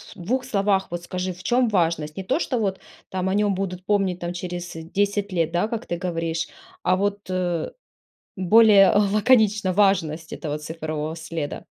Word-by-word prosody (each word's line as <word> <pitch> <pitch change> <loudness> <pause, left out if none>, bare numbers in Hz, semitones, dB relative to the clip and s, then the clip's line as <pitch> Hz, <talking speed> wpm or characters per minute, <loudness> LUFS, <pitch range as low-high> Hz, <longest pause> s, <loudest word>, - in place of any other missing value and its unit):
2 245 +8 -2
словах 200 -4 +1
вот 175 0 -4
скажи, 185 +1 -3
в 180 +1 -14
чём 245 -1 +2
важность? 165 -5 0
Не 190 - -3
то, 265 - 0
что 255 -7 -1
вот 195 -3 -1 0.3
там 185 0 -2
о - - 0
нём 205 0 +2
будут 185 -1 -4
помнить 195 -3 +1
там 175 0 -4
через 175 0 -5
10 200 +5 -1
лет, 165 -2 +1
да 175 +5 +1
как 230 +1 -4
ты 175 - -3
говоришь, 165 -2 -2 0.4
а 185 - +3
вот, 200 +1 0
э, 175 -3 -1 0.7
более 200 +1 +6
лаконично, 210 -1 +3
важность 170 -5 +1
этого 150 -2 -4
цифрового 155 0 -4
следа. 160 -2 -5
185 Hz, 170 wpm, -23 LUFS, 170-205 Hz, 0.7 s, более